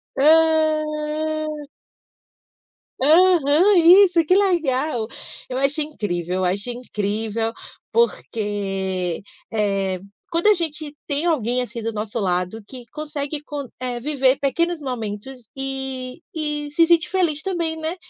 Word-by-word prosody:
Hã! 310 0 +2 1.4
Aham, 335 +4 +5
isso. 350 0 +7
Que 365 +4 +4
legal! 305 - +1 0.4
Eu 255 - -3
acho 275 +3 +1
incrível. 185 - -3
Eu 185 - 0
acho 200 +6 -1
incrível, 225 -1 -2 0.4
porque, 195 - -1 0.3
eh, 195 -3 0 0.3
quando 335 +5 +2
a 425 - +8
gente 310 -4 -2
tem 290 +2 0
alguém, 250 -7 +1
assim, 235 -1 -5
do 225 +1 -2
nosso 215 +1 -4
lado, 180 +2 -1
que 250 -2 -8
consegue 295 -1 -3
con 290 -2 -6
eh, 250 -1 -3
viver 270 -1 +2
pequenos 335 +5 0
momentos 245 -1 -6
e 265 +1 -4
e 300 -2 -2
se 330 +3 +4
sente 340 -1 +3
feliz 340 -6 +1
também, 335 -3 -2
né. 320 +2 -3
285 Hz, 120 wpm, -22 LUFS, 225-315 Hz, 1.4 s, a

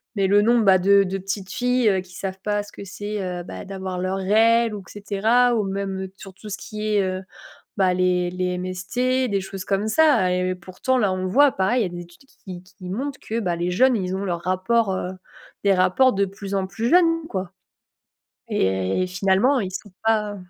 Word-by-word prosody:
Mais 195 -1 +2
le 205 +1 +4
nombre, 235 0 +3
bah, 190 -2 +6
de 200 +2 +5
de 195 +1 -3
petites 195 0 -5
filles 245 -6 +2
qui 180 -1 -17
savent 190 -1 -5
pas 205 0 0
ce 205 - -14
que - - -10
c'est, 205 +2 -5
heu, 180 -1 -4
bah, - - -8
d'avoir 190 -1 -5
leurs 185 +1 -1
règles, 225 +3 +3
ou, 200 - -8
et - - -15
cetera. 230 +5 +2
Ou 215 - +1
même, 195 0 -3
heu, 190 - -8
sur 195 -1 -11
tout 210 - -11
ce 200 - -4
qui 215 0 -6
est, 200 - +4
heu, 185 0 -2 0.6
bah, 190 -2 +3
les 180 -1 +1
les 180 0 -2
MST, 240 +9 -1
des 200 -1 0
choses 190 -1 -7
comme 200 +1 0
ça, 220 -9 +4
et 180 0 0
heu, - - -3
pourtant 185 +8 -2
là, 200 -5 +2
on 185 0 -3
le - - -1
voit 280 +7 +5
pareil, 220 +7 +1
il - - +3
y - - -1
a - - -3
des 175 - -7
études 175 +10 -18
qui 180 -8 -11
qui 185 - -23
qui 185 -2 -8
montent 270 +7 -4
que, 230 +1 -4
bah, 180 -4 -1
les 175 +1 -1
jeunes, 250 +6 +4
ils 185 -1 -2
ont 195 - -3
leur 175 -3 -2
rapport 190 +3 +1
heu, 180 - -3 0.5
des 200 -1 +4
rapports 190 +7 +3
de 200 0 +2
plus 195 +1 -7
en 190 -1 0
plus 205 +5 -3
jeunes, 330 -1 +3
quoi, 190 -1 -4 1.0
et 95 - 0
et - - -3
finalement, 195 +8 +2
ils 190 -3 -4
sont 200 +2 -7
pas 210 -2 +1
195 Hz, 230 wpm, -23 LUFS, 185-220 Hz, 1.0 s, bah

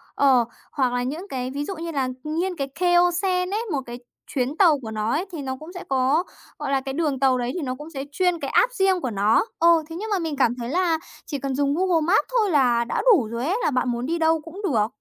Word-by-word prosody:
ờ, 260 -4 +4 0.3
hoặc 255 -4 0
là 245 - 0
những 310 +10 -4
cái 255 -3 -3
ví 285 +2 -3
dụ 390 - -5
như 335 0 -5
là 270 -4 0 0.2
nghiên 340 +4 -2
cái 275 -3 -3
Keio-sen 360 +1 +2
ấy, 435 +3 -1
một 275 -3 0
cái 240 +1 -8 0.3
chuyến 265 +3 -2
tàu 330 -7 +5
của 225 -4 -7
nó 215 +1 -1
ấy, 325 +6 0
thì 320 - -5
nó 260 -1 -3
cũng 325 +4 -10
sẽ 360 - -7
có, 270 +5 +2 0.4
gọi 275 - -3
là, 270 -1 +2
cái 270 0 -5
đường 295 -4 -1
tàu 260 -2 +3
đấy 245 0 -2
thì 360 - -3
nó 255 -2 -3
cũng 295 +4 -10
sẽ 275 -4 -5
chuyên 360 +1 +1
cái - - -4
app - - +3
riêng 385 -4 +2
của 255 - -2
nó. 210 - +2
Ồ, 335 -1 +5
thế 325 - -7
nhưng 435 +5 -5
mà 400 -3 +1
mình 320 -3 -3
cảm 245 -3 +2
thấy 240 -1 -5
là 340 0 +1 0.3
chỉ 285 - -4
cần 270 -1 -3
dùng 280 0 +1
Google 355 -1 +2
Maps 375 +5 +3
thôi 420 -3 +2
là 245 -6 +3
đã - - -1
đủ 395 - +4
rồi 235 +3 -4
ấy, 390 +6 +1
là - - +2
bạn 255 0 0
muốn 240 +1 -2
đi 335 +3 -1
đâu 325 -1 +2
cũng 335 +6 -10
được. 225 - +2
295 Hz, 270 wpm, -23 LUFS, 255-350 Hz, 0.4 s, tàu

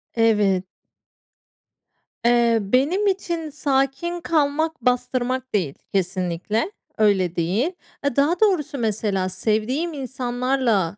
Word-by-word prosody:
Evet. 210 -5 +3 1.6
Eee, 235 -1 +4
benim 280 - +2
için 340 -5 -1
sakin 290 +4 -1
kalmak 315 -1 0
bastırmak 250 +1 0
değil 170 -9 0 0.2
kesinlikle. 190 - -1 0.3
Öyle 190 -5 +2
değil. 195 - 0 0.3
Aaa, 280 -4 0
daha 290 +5 +2
doğrusu 365 -10 +2
mesela 210 -4 0
sevdiğim 220 - -1
insanlarla, 245 - -1
245 Hz, 95 wpm, -23 LUFS, 205-290 Hz, 1.6 s, Eee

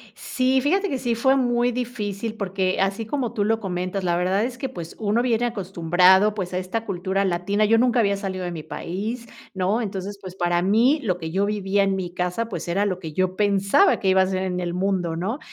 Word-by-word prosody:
Sí, 260 0 0
fíjate 385 +8 +1
que 270 -4 -2
sí, 235 -1 -1
fue 265 +4 +3
muy 245 -2 +2
difícil, 230 -3 -4
porque, 190 -2 -1
así 195 +3 0
como 245 0 -2
tú 210 -4 0
lo 225 +2 +1
comentas, 185 0 -3
la 175 -1 +1
verdad 185 +4 +1
es 250 +1 -4
que, 265 0 -4
pues, 170 -10 -8
uno 215 +1 +1
viene 240 -1 +1
acostumbrado, 190 -1 +3
pues 185 -3 -4
a - - 0
esta 185 +5 -3
cultura 190 0 -1
latina. 190 +4 +1
Yo 225 +2 +4
nunca 245 0 +3
había 200 -3 +2
salido 190 -2 -4
de 175 - -3
mi 160 -3 -6
país, 210 +9 -5 0.3
¿no? 195 +4 0
Entonces, 200 -1 -5
pues, 185 -1 -9
para 175 -1 +1
mí, 230 - +3
lo 185 -6 0
que 160 -2 -6
yo 195 +3 +1
vivía 200 -1 +1
en 195 -1 +1
mi 180 -2 -4
casa, 180 +6 -2
pues, 175 -6 -5
era 195 +4 +1
lo 185 -3 -2
que 160 -4 -7
yo 185 +2 0
pensaba, 200 - +3
que 195 - +1
iba 190 0 +5
a 190 - +2
ser 190 0 -1
en 180 -1 -2
el 175 -1 -3
mundo, 180 -3 -1
¿no? 200 - -3
195 Hz, 230 wpm, -23 LUFS, 185-225 Hz, 0.3 s, iba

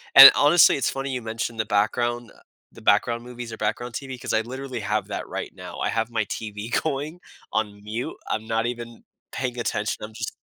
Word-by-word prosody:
And, 135 0 +14
honestly, 150 +1 +6
it's - - +1
funny 135 0 -3
you 125 -1 -3
mentioned 115 0 -4
the 110 - +1
background, 120 +3 0
uh - - -20 0.3
the 115 - -14
background 115 +3 +2
movies 120 -2 -8
or - - -7
background 115 +3 -2
TV, 130 -1 -5
'cause - - -3
I 110 - +3
literally 130 +1 -6
have 105 -1 -1
that - - -4
right - - -5
now. - - -9
I - - 0
have 115 0 -1
my 115 -2 0
TV 105 +1 -5
going 155 +3 -3 0.3
on 105 -2 -2
mute, 110 +4 -4 0.2
I'm 110 0 -2
not 115 +1 0
even 120 -1 -5 0.3
paying 125 -2 -3
attention, 105 -2 -1
I'm 110 +1 -7
just 115 0 -5
115 Hz, 205 wpm, -24 LUFS, 110-125 Hz, 0.3 s, And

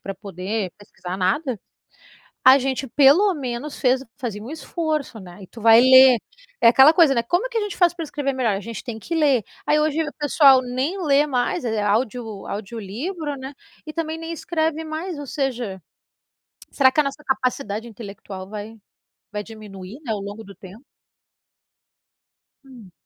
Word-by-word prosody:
pra 195 - -6
poder 195 +1 -4
pesquisar 185 -3 -8
nada, 215 - -1 0.9
a 260 +1 +9
gente 265 0 -2
pelo 295 - +5
menos 270 -1 -5
fez 260 0 +2
fazia 220 -5 -5
um 245 - -8
esforço, 310 -5 -3
né, 180 0 -12
e - - -12
tu 230 - -13
vai 225 +1 +7
ler. 260 0 +8 0.4
É - - +7
aquela 265 +6 +7
coisa, 320 -5 +5
né, 235 - +1
como 355 - 0
que 470 - -3
a - - +1
gente 415 -1 -4
faz 350 -2 +4
para 340 -2 -5
escrever 285 -2 -3
melhor? 240 -6 0
A - - -5
gente 230 0 -7
tem 235 -4 -6
que 335 +9 -5
ler. 280 -8 +3 0.2
Aí 300 - +3
hoje 310 +1 +1
o 300 - -6
pessoal 280 -3 +5
nem 260 +10 -3
lê 285 0 +4
mais, 255 +5 -1
eh, 225 -2 -1
é 210 - 0
audio 220 -1 -2
audiolivro, 235 - -5
né, 265 +1 -8 0.3
e 310 - -6
também 320 -1 -3
nem 325 0 -6
escreve 320 -1 -2
mais, 320 +2 -5
ou 290 - -6
seja, 245 -9 -3 0.9
será 265 -2 +4
que 300 - 0
a - - -1
nossa 275 +2 -5
capacidade 255 -4 -2
intelectual 200 -4 -9
vai 210 +1 -7 0.6
vai 210 0 -4
diminuir, 210 0 -11
né, 230 - -3
ao 210 - -3
longo 205 +2 -7
do 200 - -12
tempo? 200 +7 -14 1.8
Hum. 245 -8 -15
255 Hz, 175 wpm, -22 LUFS, 215-300 Hz, 1.8 s, a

